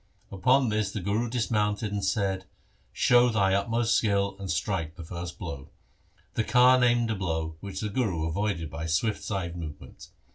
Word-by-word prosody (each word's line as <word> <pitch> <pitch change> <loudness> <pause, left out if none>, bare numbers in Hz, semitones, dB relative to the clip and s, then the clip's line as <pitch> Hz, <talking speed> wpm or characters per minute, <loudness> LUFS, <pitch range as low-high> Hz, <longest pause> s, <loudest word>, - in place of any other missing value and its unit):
Upon 125 +7 +3
this 105 -2 0
the 105 - -4
Guru 105 +6 -1
dismounted 105 -3 0
and 100 -1 -2
said, 95 -1 0 0.2
' - - -38
Show 125 0 +4
thy 100 -4 +2
utmost 115 +4 +1
skill 100 -2 +1
and 95 -1 -6
strike 80 0 -2
the 85 - -8
first 85 +1 -6
blow.' 70 -1 -7 0.6
The 110 - 0
Khan 125 +1 +5
aimed 120 -1 +3
a - - -1
blow, 80 -4 -2
which 95 0 -6
the 105 - -2
Guru 100 -8 -1
avoided 85 -2 -2
by 75 +3 -5
a - - -4
swift 105 +7 0
side 90 -5 -3
movement. 75 -4 -9
100 Hz, 180 wpm, -27 LUFS, 85-110 Hz, 0.6 s, Khan